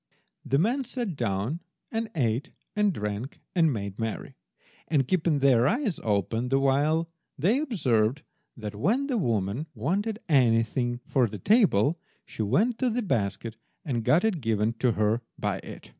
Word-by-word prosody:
The 135 - +1
men 240 - +1
sat 240 -7 -3
down, 115 - -1 0.3
and 225 0 -2
ate 125 -1 0 0.3
and 210 -1 +3
drank 105 - -4
and 165 -4 +3
made 100 -3 -4
merry; 115 -1 -4 0.5
and, 140 -5 +1
keeping 165 -3 +2
their 130 -3 +4
eyes 230 - 0
open 110 +4 0
the 135 - +3
while, 145 +4 +2 0.3
they 200 - +2
observed 140 - +1 0.3
that 105 -2 -6
when 205 - +1
the 260 -5 0
woman 115 - -1
wanted 195 - -1
anything 120 -3 +2
for 130 -4 +2
the 105 0 -7
table 175 - +3 0.3
she - - -6
went 205 - +1
to 255 - +2
the 240 +1 -1
basket 110 - -2 0.3
and 120 -6 -1
got 160 +9 +4
it 195 -8 0
given 110 -1 +1
to 125 -3 +2
her 110 +2 +1 0.2
by - - -2
it. - - -11
135 Hz, 160 wpm, -27 LUFS, 115-185 Hz, 0.5 s, their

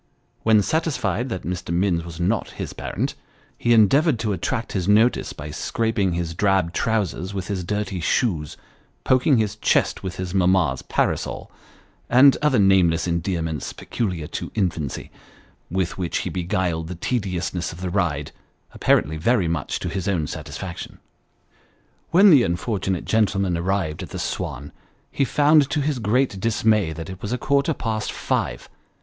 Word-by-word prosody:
When 110 -2 +4
satisfied 130 - -1
that 95 -5 -4
Mr. 90 -1 -4
Minns 85 -1 +1
was 85 0 -9
not 100 +5 0
his - - -5
parent, - - -3 0.4
he 120 - 0
endeavoured 130 - +5
to 105 -3 0
attract 110 +6 -2
his 95 -2 -2
notice 110 +4 +3
by 75 +1 -8
scraping 100 +2 -1
his 85 -1 -2
drab 95 -2 +1
trousers 100 -4 -1
with 95 -2 -4
his 95 -3 -2
dirty 105 0 -2
shoes, 85 - 0 0.5
poking 130 +1 +3
his 110 -2 0
chest - - +1
with 95 -2 -5
his 90 -1 -5
mamma's 90 -8 +2
parasol, - - -2 0.6
and 130 +3 +7
other 150 -4 +3
nameless 90 -4 +4
endearments 85 -3 -2
peculiar 90 -9 -3
to - - -5
infancy, 85 -9 -2 0.6
with 95 +1 -2
which 90 -2 -1
he - - -4
beguiled 90 -3 -1
the 90 - -6
tediousness 90 -4 -2
of 80 - -10
the 90 -1 -3
ride, 80 -7 -1 0.4
apparently 80 +1 +2
very 100 +2 +2
much 80 -3 -2
to - - -4
his 95 -2 -3
own 90 -6 +1
satisfaction. 90 +3 -7 1.1
When 195 +3 +7
the 145 -5 +7
unfortunate 95 -1 -1
gentleman 100 -4 +1
arrived 85 -2 -1
at - - -7
the - - -6
Swan, - - -4 0.4
he 140 - +1
found 145 +1 +4
to 150 - 0
his 145 -2 -1
great 115 -1 +1
dismay, 110 -4 +2
that 80 0 -7
it 95 +1 -10
was 105 - -4
a 125 - 0
quarter 140 +4 +1
past 110 -2 -2
five. - - -2
95 Hz, 155 wpm, -23 LUFS, 85-115 Hz, 1.1 s, and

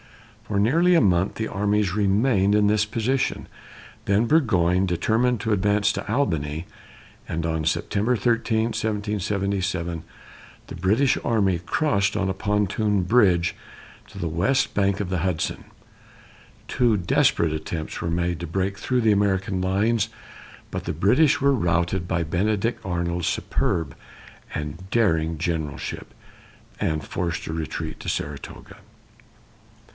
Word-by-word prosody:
For 100 -2 0
nearly 165 - +4
a - - +6
month 95 -3 +2
the 110 - -2
armies 105 -1 0
remained 100 0 +2
in 105 0 +4
this 105 0 +3
position; 120 +5 -1 0.6
then 100 +3 +2
Burgoyne 95 - +3
determined 110 +7 +1
to 110 0 0
advance 100 +1 +2
to - - -5
Albany, 80 - -1 0.6
and 80 0 -3
on 80 -1 -1
September 105 +9 0
13, 115 0 +1
1777, 100 -5 -2 0.6
the - - -8
British 105 +10 +2
army 100 -6 +1
crossed 100 - 0
on 100 -2 0
a - - 0
pontoon 105 -1 0
bridge 90 -5 +3 0.5
to - - -14
the 85 - -2
west 90 - +1
bank 100 -1 +1
of 100 -4 -3
the 95 -2 -1
Hudson. 85 -2 -2 1.0
Two 120 -4 +2
desperate 125 - +2
attempts 80 +1 -5
were 85 - -2
made 85 -1 -1
to 85 - -4
break 95 +4 -2
through 125 +2 0
the 110 -2 +4
American 95 -2 0
lines, 105 +5 +1 0.6
but - - -4
the - - -3
British 130 - +3
were 140 0 +3
routed 85 -4 0
by 85 -1 0
Benedict 105 +7 -1
Arnold's 85 -2 -2
superb 80 -5 -1 0.6
and 80 +5 -6
daring 80 -8 +1
generalship, 80 -3 -4 0.7
and 80 -1 -1
forced 85 -1 -3
to 80 - -5
retreat 80 0 -4
to - - -4
Saratoga. 70 -1 -6
100 Hz, 130 wpm, -24 LUFS, 85-110 Hz, 1.0 s, a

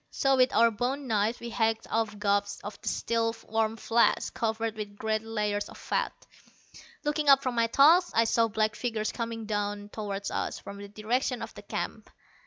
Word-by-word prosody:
So 270 -1 +2
with 255 0 +4
our 230 0 +6
bone 255 +6 -2
knives 220 0 +1
we 235 0 -6
hacked 225 -1 0
off 220 -2 0
gobs 200 0 0
of 205 +1 -8
the - - -10
still 230 0 0
warm 220 0 0
flesh, 235 +1 +2
covered 225 0 -2
with 210 -2 -6
great 220 0 0
layers 210 -2 -2
of - - -12
fat. - - -1 0.9
Looking 295 0 +1
up 275 0 +7
from 255 - -1
my 230 -1 +2
task, 320 +9 +5
I 230 - +5
saw 230 0 +3
black 215 0 0
figures 220 -3 -2
coming 230 -1 -4
toward 205 -1 -3
us - - -2
from 200 0 -9
the 200 - -8
direction 230 +4 -1
of - - -8
the - - -10
camp. - - -5
225 Hz, 185 wpm, -28 LUFS, 210-235 Hz, 0.9 s, up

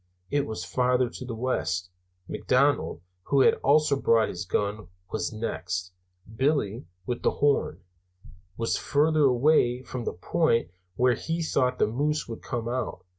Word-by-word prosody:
I 145 - +3
was 110 -9 -3
farthest 125 +2 +1
to 130 - -6
the 120 -2 -5
west; 95 -7 -2 0.4
McDonald 135 - +1 0.2
(who 140 -1 +3
had - - +6
also 145 0 +4
brought 115 -4 +3
his 90 +1 -5
gun) 105 +1 -2 0.2
was 110 - -2
next; 90 -5 -4 0.4
Billy, 130 - 0 0.2
with 120 +3 -3
the - - +3
horn, 145 -8 0 0.7
was 115 0 0
farthest 155 +2 +2
away 130 -1 +3
from 125 -2 -6
the - - -2
point 115 - +1 0.2
where 125 +2 +3
he 165 +7 -3
thought 125 -5 +1
the - - +3
moose 145 +7 -1
would 115 -1 -7
come 115 -1 -4
out. 125 0 -3
125 Hz, 150 wpm, -27 LUFS, 110-140 Hz, 0.7 s, had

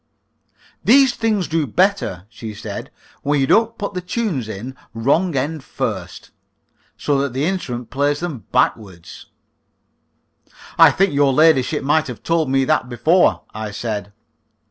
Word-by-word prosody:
"These 265 +1 +5
things 215 -6 0
do 160 -2 0
better," 180 - 0
she 110 -1 -9
said, 100 -1 -7 0.3
"when 145 0 +1
you 135 - +3
don't 230 +9 +2
put 205 -1 -4
the 180 - -3
tunes 180 - -2
in 115 +6 -7 0.2
wrong 145 +9 +1
end 145 +2 -2
first, - - -5 0.7
so 145 -2 0
that 140 -3 -2
the 135 +3 -1
instrument 125 -10 -3
plays 145 +3 0
them 160 -10 -5
backwards." 100 -8 -2 1.5
"I - - +9
think 195 -2 +1
your 140 -1 +3
ladyship 150 -1 +3
might 155 +3 +2
have 125 -3 -8
told 165 -4 +1
me 135 0 +2
that 125 - +1
before," 155 +9 +2
I 110 0 -5
said. 105 -1 -4
140 Hz, 145 wpm, -20 LUFS, 120-175 Hz, 1.5 s, I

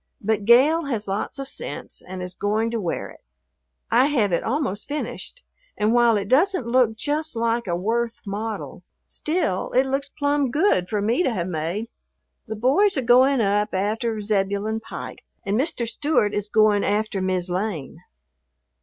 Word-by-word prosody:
But 210 -1 -1
Gale 285 +8 +5
has 230 -7 -3
lots 200 +7 -3
of 275 -1 -4
sense - - -6
and 185 0 -7
is 180 0 -5
going 215 +4 -1
to 230 -2 -2
wear 175 - -3
it. - - -17 0.7
I 245 +4 +5
have 235 -10 +1
it 170 - +1
almost 230 -6 -2
finished, 300 +11 -5 0.3
and 215 +2 +2
while 240 -2 +4
it 200 -1 -3
doesn't 315 - +3
look 235 -2 +2
just 300 +4 -2
like 230 0 0
a 170 - 0
Worth 230 +5 -1
model, 210 +2 -5 0.2
still 305 - -1
it 260 +2 +4
looks 275 +1 -2
plumb 285 -1 0
good 290 - +2
for 210 -2 -1
me 230 +9 +2
to 270 - +1
have 180 -6 -2
made. 175 +6 -3 0.6
The 220 - -4
boys 280 - +3
are 265 - 0
going 255 +2 +5
up 205 0 +1
after 215 +3 -1
Zebulon 205 +1 -1
Pike, 225 - -8 0.2
and 200 +1 0
Mr. 250 -2 -1
Stewart 230 -3 +1
is 205 0 -1
going 210 -1 +3
after 205 -1 0
"Mis' 185 -1 -1
Lane." 175 -5 -3
225 Hz, 170 wpm, -23 LUFS, 200-265 Hz, 0.7 s, Gale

